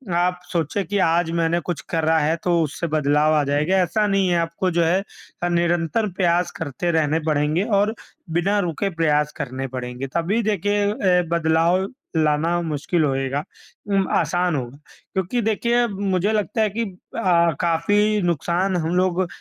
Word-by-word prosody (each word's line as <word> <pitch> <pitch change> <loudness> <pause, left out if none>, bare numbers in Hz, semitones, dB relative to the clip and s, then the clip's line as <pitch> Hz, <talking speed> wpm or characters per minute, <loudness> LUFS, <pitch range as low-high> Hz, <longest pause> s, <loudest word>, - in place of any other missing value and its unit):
आप 180 +1 +1
सोचें 170 +3 -1
कि 205 +5 -2
आज 170 -1 +2
मैंने 165 +1 +1
कुछ 175 0 -4
करा 160 0 +2
है 155 +2 +1
तो 175 -2 +2
उससे 155 +3 -3
बदलाव 150 0 +2
आ 150 - +3
जाएगा, 150 +7 +1
ऐसा 185 +4 +1
नहीं 195 -1 +2
है। 175 - +2
आपको 170 +2 -1
जो 170 0 +2
है 175 +4 +2 0.4
अ, 175 - +1
निरंतर 175 +5 +1
प्रयास 175 -1 +1
करते 165 +3 -2
रहने 160 -1 +1
पड़ेंगे 150 +3 +1 0.2
और 210 +2 +1 0.4
बिना 190 +5 +1
रुके 185 +1 -1
प्रयास 150 -2 +1
करने 135 0 -4
पड़ेंगे। 125 +1 -5
तभी 180 +7 +1
देखिए 205 0 0
अ, 185 -4 +2
बदलाव 170 +3 +2 0.3
लाना 160 +2 +2
मुश्किल 160 +1 -1
होएगा 135 +1 -1 0.4
उम, 195 -2 +1
आसान 175 -2 +1
होगा 130 0 -5 0.4
क्योंकि 190 +5 -1
देखिए 235 +2 +1
मुझे 195 -1 -1
लगता 215 +1 0
है 215 - +2
कि 225 +4 -2
अ, 180 -3 0
काफ़ी 205 +5 +2
नुकसान 175 +3 0
हम 165 +1 -1
लोग 185 0 +1
175 Hz, 160 wpm, -22 LUFS, 160-190 Hz, 0.4 s, आ